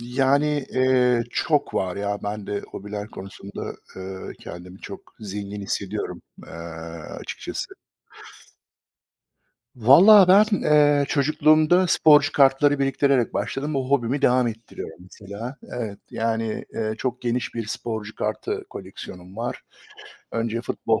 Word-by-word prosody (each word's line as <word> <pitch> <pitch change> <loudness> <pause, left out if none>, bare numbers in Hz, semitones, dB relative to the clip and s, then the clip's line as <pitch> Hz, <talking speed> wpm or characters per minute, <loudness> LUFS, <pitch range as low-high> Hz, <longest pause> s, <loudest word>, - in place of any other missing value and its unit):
Yani, 135 +4 +1
eee, 125 -2 +3
çok 145 +3 0
var 90 -1 -1
ya. 100 0 -2
Ben 105 0 -4
de 100 0 -2
hobiler 105 +1 -6
konusunda, 95 0 -8 0.2
eee, 95 0 -7
kendimi 90 +2 -10
çok - - -10
zengin 100 0 -6
hissediyorum, 100 - -4 0.2
eee, - - -12 0.7
açıkçası. - - -6 2.0
Valla 180 - +8
ben, 205 +2 +5
eee, 145 -1 +4
çocukluğumda 155 +4 +4
sporcu 150 -4 +5
kartları 140 +1 +4
biriktirerek 135 -2 +2
başladım. 145 +2 -2
O 130 -1 -2
hobimi 135 0 +1
devam 125 -1 +4
ettiriyorum 115 -1 -8
mesela. 100 +7 -8 0.2
Evet, 110 -5 -4
yani, 115 -1 -2
eee, 110 -1 -2
çok 125 0 -3
geniş 120 0 -2
bir 115 -2 -3
sporcu 110 -1 -5
kartı 105 -2 -3
koleksiyonum 90 +2 -10
var. 120 +2 -4 0.7
Önce 115 0 -2
futbol 115 -2 -1
120 Hz, 115 wpm, -24 LUFS, 105-140 Hz, 2.0 s, Valla